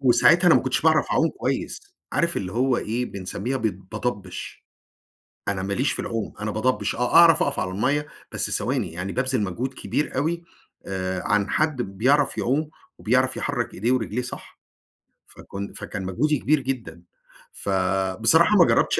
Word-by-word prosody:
وساعتها 140 Hz, +7 st, +5 dB
أنا -, -, +7 dB
ما -, -, +5 dB
كنتش -, -, 0 dB
باعرف -, -, +3 dB
أعوم -, -, +3 dB
كويس، -, -, -3 dB, 0.3 s
عارف 170 Hz, 0 st, +1 dB
اللي 95 Hz, -1 st, -3 dB
هو 125 Hz, +3 st, +2 dB
إيه، 120 Hz, +3 st, -2 dB
بنسمّيها 100 Hz, +6 st, -4 dB
بت 110 Hz, -5 st, 0 dB, 0.2 s
باضبّش. 105 Hz, -5 st, -5 dB, 0.8 s
أنا 95 Hz, -2 st, -1 dB
ماليش 100 Hz, +9 st, 0 dB
في -, -, -4 dB
العوم، 115 Hz, -2 st, -3 dB
أنا 105 Hz, 0 st, -2 dB
باضبّش 115 Hz, +5 st, 0 dB
آه، 125 Hz, +1 st, -1 dB
أعرف 165 Hz, -1 st, +7 dB
أقف 145 Hz, -, -1 dB
على 95 Hz, -, -2 dB
المَيّة، 140 Hz, +10 st, 0 dB, 0.3 s
بس -, -, -2 dB
ثواني، 120 Hz, -10 st, -1 dB
يعني 90 Hz, +3 st, -4 dB
بابذِل 125 Hz, -2 st, 0 dB
مجهود 120 Hz, +8 st, -3 dB
كبير 145 Hz, +2 st, -2 dB
أوي، 165 Hz, +5 st, -1 dB, 0.4 s
آآ، 95 Hz, -1 st, -3 dB
عن 105 Hz, -1 st, +1 dB
حد 150 Hz, -5 st, +1 dB
بيعرف 125 Hz, +9 st, +1 dB
يعوم 150 Hz, +5 st, 0 dB, 0.3 s
وبيعرف -, -, +1 dB
يحرّك -, -, -2 dB
ايديه 115 Hz, +7 st, 0 dB
ورجليه 125 Hz, -1 st, -1 dB
صح. 125 Hz, -, -9 dB, 0.7 s
فكن 100 Hz, 0 st, -8 dB
فكان 100 Hz, -3 st, -6 dB
مجهودي 145 Hz, +11 st, +1 dB
كبير 155 Hz, +1 st, +2 dB
جدًا. 120 Hz, -11 st, -5 dB, 0.5 s
فبصراحة 95 Hz, -, +2 dB
ما 175 Hz, -, +7 dB
جربتش -, -, +2 dB
120 Hz, 160 wpm, -24 LUFS, 100-140 Hz, 0.8 s, أنا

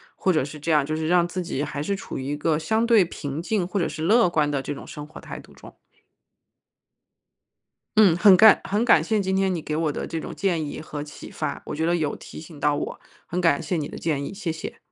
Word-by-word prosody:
或 190 Hz, -, +1 dB
者 155 Hz, -, +2 dB
是 150 Hz, +2 st, -8 dB
这 165 Hz, +3 st, -2 dB
样 150 Hz, -2 st, +4 dB
就 155 Hz, +3 st, -3 dB
是 155 Hz, 0 st, -2 dB
让 175 Hz, 0 st, +3 dB
自 180 Hz, +1 st, -4 dB
己 145 Hz, -4 st, -3 dB
还 145 Hz, -1 st, -4 dB
是 200 Hz, +6 st, -1 dB
处 195 Hz, -, -7 dB
于 130 Hz, -, -5 dB
一 145 Hz, +2 st, -2 dB
个 150 Hz, +1 st, 0 dB
相 220 Hz, +8 st, 0 dB
对 225 Hz, -6 st, +5 dB
平 145 Hz, -3 st, -6 dB
静 180 Hz, +1 st, -1 dB
或 200 Hz, +2 st, -2 dB
者 170 Hz, -, +1 dB
是 155 Hz, -, -7 dB
乐 215 Hz, +6 st, +4 dB
观 155 Hz, -4 st, +1 dB
的 140 Hz, -2 st, -2 dB
这 -, -, -3 dB
种 -, -, -10 dB
生 150 Hz, -, -8 dB
活 155 Hz, -, -12 dB
态 -, -, -8 dB
度 -, -, -16 dB
中。 -, -, -15 dB, 2.2 s
嗯， 195 Hz, -6 st, +6 dB
很 190 Hz, +1 st, +7 dB
感 220 Hz, +2 st, +7 dB
很 210 Hz, +4 st, 0 dB
感 245 Hz, -, +5 dB
谢 220 Hz, -1 st, 0 dB
今 190 Hz, -1 st, 0 dB
天 190 Hz, -1 st, +1 dB
你 -, -, -2 dB
给 150 Hz, -1 st, -4 dB
我 155 Hz, -1 st, 0 dB
的 -, -, -4 dB
这 165 Hz, -, -4 dB
种 -, -, -7 dB
建 175 Hz, -5 st, 0 dB
议 -, -, -6 dB
和 150 Hz, -2 st, -6 dB
启 150 Hz, -, -11 dB
发， -, -, -4 dB
我 -, -, -5 dB
觉 160 Hz, -, -2 dB
得 170 Hz, +1 st, +2 dB
有 155 Hz, -4 st, -1 dB
提 -, -, -11 dB
醒 155 Hz, -1 st, -12 dB
到 145 Hz, +1 st, +2 dB
我， -, -, -4 dB, 0.3 s
很 180 Hz, +2 st, -3 dB
感 165 Hz, -5 st, +3 dB
谢 165 Hz, +2 st, -2 dB
你 150 Hz, -3 st, -2 dB
的 -, -, -9 dB
建 150 Hz, -4 st, -1 dB
议， -, -, -5 dB
谢 190 Hz, -4 st, -3 dB
谢。 160 Hz, -, -7 dB
165 Hz, 280 characters per minute, -24 LUFS, 150-190 Hz, 2.2 s, 很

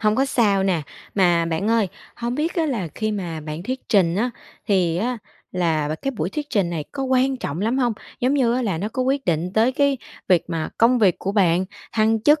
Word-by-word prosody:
hông 215 Hz, 0 st, +2 dB
có 270 Hz, -, +3 dB
sao 205 Hz, -7 st, +2 dB
nè. 180 Hz, -5 st, +1 dB, 0.3 s
Mà 175 Hz, -4 st, +3 dB
bạn 165 Hz, +6 st, -1 dB
ơi, 225 Hz, -4 st, +3 dB, 0.3 s
hông 240 Hz, +1 st, -2 dB
biết 310 Hz, +4 st, -1 dB
á 330 Hz, -3 st, +1 dB
là 225 Hz, -, -2 dB
khi 215 Hz, -1 st, -1 dB
mà 170 Hz, -6 st, -4 dB
bạn 155 Hz, +2 st, -6 dB
thuyết 255 Hz, +5 st, -3 dB
trình 180 Hz, -5 st, +3 dB
á, 240 Hz, +5 st, +1 dB, 0.4 s
thì 180 Hz, -5 st, +2 dB
á 240 Hz, +4 st, -1 dB, 0.3 s
là 160 Hz, -4 st, +1 dB
và 155 Hz, -, -1 dB
cái 270 Hz, +12 st, -3 dB
buổi 190 Hz, -9 st, -3 dB
thuyết 295 Hz, +3 st, -5 dB
trình 195 Hz, -7 st, +1 dB
này 160 Hz, -4 st, -3 dB
có 275 Hz, -, -3 dB
quan 260 Hz, 0 st, +2 dB
trọng 155 Hz, -, -4 dB
lắm 230 Hz, +6 st, +1 dB
hông? 245 Hz, -3 st, +2 dB, 0.3 s
Giống 260 Hz, +3 st, +2 dB
như 240 Hz, -4 st, +3 dB
á 255 Hz, -, 0 dB
là 190 Hz, -8 st, -1 dB
nó 205 Hz, -, -2 dB
có 255 Hz, +4 st, -2 dB
quyết 270 Hz, +2 st, 0 dB
định 175 Hz, +1 st, 0 dB
tới 225 Hz, +5 st, +3 dB
cái 280 Hz, 0 st, +2 dB, 0.3 s
việc 180 Hz, -3 st, +4 dB
mà 165 Hz, -2 st, -2 dB
công 240 Hz, +2 st, +5 dB
việc 195 Hz, -6 st, +3 dB
của 195 Hz, -, -2 dB
bạn, 185 Hz, -3 st, +3 dB, 0.3 s
thăng 220 Hz, 0 st, +2 dB
chức, 295 Hz, +4 st, +5 dB
215 Hz, 235 wpm, -22 LUFS, 175-255 Hz, 0.4 s, công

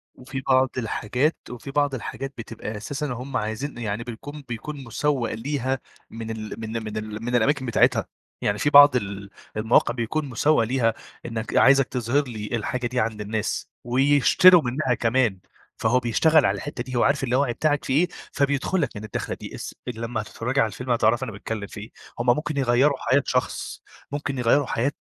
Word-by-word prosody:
وفي 130 Hz, +1 st, -6 dB
بعض 130 Hz, 0 st, +4 dB
الحاجات 125 Hz, +5 st, 0 dB
وفي 125 Hz, +3 st, -8 dB
بعض 145 Hz, -1 st, +1 dB
الحاجات 135 Hz, +2 st, -5 dB
بتبقى 110 Hz, -1 st, -6 dB
أساسًا 140 Hz, +8 st, -4 dB
هُم 125 Hz, +3 st, -4 dB
عايزين 110 Hz, +7 st, -3 dB
يعني 110 Hz, -1 st, -3 dB
بيكون 145 Hz, +6 st, -8 dB
بيكون 140 Hz, +4 st, -6 dB
مسوّق 130 Hz, 0 st, -1 dB
ليها 130 Hz, +1 st, -2 dB, 0.3 s
من 115 Hz, 0 st, -6 dB
ال 110 Hz, -1 st, -6 dB
من 110 Hz, 0 st, -4 dB
من 110 Hz, 0 st, -5 dB
ال 110 Hz, +1 st, -5 dB
من 120 Hz, +1 st, -1 dB
الأماكن 135 Hz, +3 st, +2 dB
بتاعتها، 120 Hz, -1 st, +3 dB, 0.4 s
يعني 105 Hz, -, 0 dB
في 145 Hz, -, +2 dB
بعض 145 Hz, -2 st, +9 dB
ال 100 Hz, -3 st, -3 dB, 0.3 s
المواقع 110 Hz, +2 st, +3 dB
بيكون 125 Hz, +6 st, -2 dB
مسوّق 130 Hz, +2 st, +3 dB
ليها، 115 Hz, -1 st, +1 dB, 0.3 s
إنك 110 Hz, -2 st, -4 dB
عايزك 135 Hz, 0 st, +6 dB
تظهر 125 Hz, +3 st, 0 dB
لي 110 Hz, -3 st, -6 dB
الحاجة 120 Hz, +3 st, -2 dB
دي 125 Hz, +1 st, -2 dB
عند 110 Hz, -1 st, -1 dB
الناس، 105 Hz, 0 st, -2 dB
ويشتروا 145 Hz, +7 st, +6 dB
منها 130 Hz, 0 st, 0 dB
كمان، 115 Hz, -4 st, +1 dB, 0.4 s
فهو 120 Hz, +3 st, +2 dB
بيشتغل 150 Hz, +5 st, +3 dB
على 100 Hz, 0 st, +2 dB
الحتة 120 Hz, +4 st, -5 dB
دي، 130 Hz, 0 st, -7 dB
هو 120 Hz, -, +3 dB
عارف 140 Hz, -1 st, +2 dB
اللاوعي 130 Hz, 0 st, +1 dB
بتاعك 145 Hz, +3 st, 0 dB
فيه 130 Hz, -, -1 dB
إيه، -, -, -10 dB, 0.2 s
فبيدخل 145 Hz, +5 st, +1 dB
لك 140 Hz, -, 0 dB
من 105 Hz, -, -7 dB
الداخلة 110 Hz, -, -4 dB
دي -, -, -8 dB
اس -, -, -7 dB
لما 115 Hz, -1 st, -3 dB
هتتفرجي 120 Hz, +5 st, -3 dB
على 115 Hz, -, +3 dB
الفيلم 125 Hz, +3 st, -5 dB
هتعرفي 120 Hz, +2 st, +3 dB
أنا 120 Hz, -, -4 dB
باتكلم 100 Hz, +1 st, -5 dB
في -, -, -9 dB
إيه، 110 Hz, -, -10 dB, 0.3 s
هُم 120 Hz, -, -1 dB
ممكن 150 Hz, -1 st, -3 dB
يغيّروا 135 Hz, +2 st, +3 dB
حياة 130 Hz, +3 st, +2 dB
شخص، 125 Hz, 0 st, -2 dB, 0.3 s
ممكن 145 Hz, -1 st, -3 dB
يغيّروا 125 Hz, +4 st, +3 dB
حياة 130 Hz, +5 st, 0 dB
125 Hz, 180 wpm, -24 LUFS, 110-140 Hz, 0.4 s, بعض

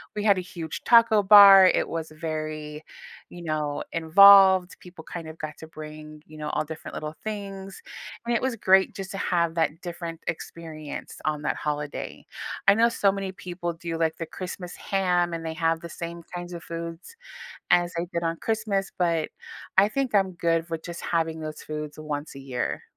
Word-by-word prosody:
We 210 Hz, -, -2 dB
had 200 Hz, -3 st, +4 dB
a -, -, -1 dB
huge 170 Hz, -3 st, -7 dB
taco 230 Hz, -3 st, +6 dB
bar, 195 Hz, -1 st, +10 dB
it -, -, +2 dB
was 160 Hz, -1 st, -5 dB
very, 155 Hz, -1 st, -5 dB, 0.5 s
you 175 Hz, -, -10 dB
know, 150 Hz, -2 st, -2 dB
involved, 190 Hz, +2 st, +7 dB
people, 175 Hz, -3 st, -13 dB
kind 165 Hz, -2 st, -7 dB
of, 160 Hz, +1 st, -9 dB
got 155 Hz, 0 st, -7 dB
to 160 Hz, -, -10 dB
bring, 155 Hz, -1 st, -10 dB
you 155 Hz, 0 st, -13 dB
know, 150 Hz, 0 st, -4 dB
all -, -, -1 dB
different 160 Hz, +1 st, -9 dB
little 155 Hz, 0 st, -5 dB
things, 195 Hz, -2 st, -6 dB, 0.4 s
and 235 Hz, 0 st, 0 dB
it -, -, +1 dB
was 260 Hz, -2 st, -1 dB
great 190 Hz, -2 st, +4 dB
just 195 Hz, -1 st, -6 dB
to 195 Hz, -, -5 dB
have 170 Hz, -3 st, 0 dB
that 165 Hz, 0 st, 0 dB
different 170 Hz, -2 st, -6 dB
experience, 160 Hz, -2 st, -6 dB
on 150 Hz, -1 st, -1 dB
that -, -, -1 dB
holiday. 150 Hz, -1 st, -4 dB, 0.4 s
I 195 Hz, -, +7 dB
know 230 Hz, +2 st, +4 dB
so 200 Hz, -4 st, +2 dB
many 195 Hz, -1 st, -4 dB
people 175 Hz, -2 st, -5 dB
do, 165 Hz, 0 st, -5 dB
like, 160 Hz, -1 st, 0 dB
the 165 Hz, -, -4 dB
Christmas 180 Hz, +1 st, -7 dB
ham, 180 Hz, -3 st, 0 dB
and 165 Hz, 0 st, -5 dB
they 160 Hz, -, -3 dB
have 165 Hz, -1 st, +1 dB
the 170 Hz, -, -8 dB
same 170 Hz, +1 st, -7 dB
kinds 175 Hz, 0 st, -6 dB
of 170 Hz, -, -7 dB
foods 170 Hz, -, -7 dB, 0.6 s
as 175 Hz, 0 st, +3 dB
they 170 Hz, +1 st, -2 dB
did 170 Hz, -, -2 dB
on 165 Hz, 0 st, -1 dB
Christmas, 215 Hz, -3 st, -1 dB
but 170 Hz, -3 st, +1 dB, 0.5 s
I 200 Hz, +2 st, +7 dB
think 265 Hz, -1 st, -2 dB
I'm 190 Hz, -2 st, +3 dB
good 165 Hz, -1 st, 0 dB
with 165 Hz, -1 st, -4 dB
just 170 Hz, -1 st, -7 dB
having 165 Hz, -1 st, -1 dB
those 155 Hz, 0 st, -7 dB
foods 150 Hz, 0 st, -6 dB
once 150 Hz, -1 st, -5 dB
a -, -, -9 dB
year. 130 Hz, -2 st, -3 dB
170 Hz, 190 wpm, -26 LUFS, 155-190 Hz, 0.6 s, bar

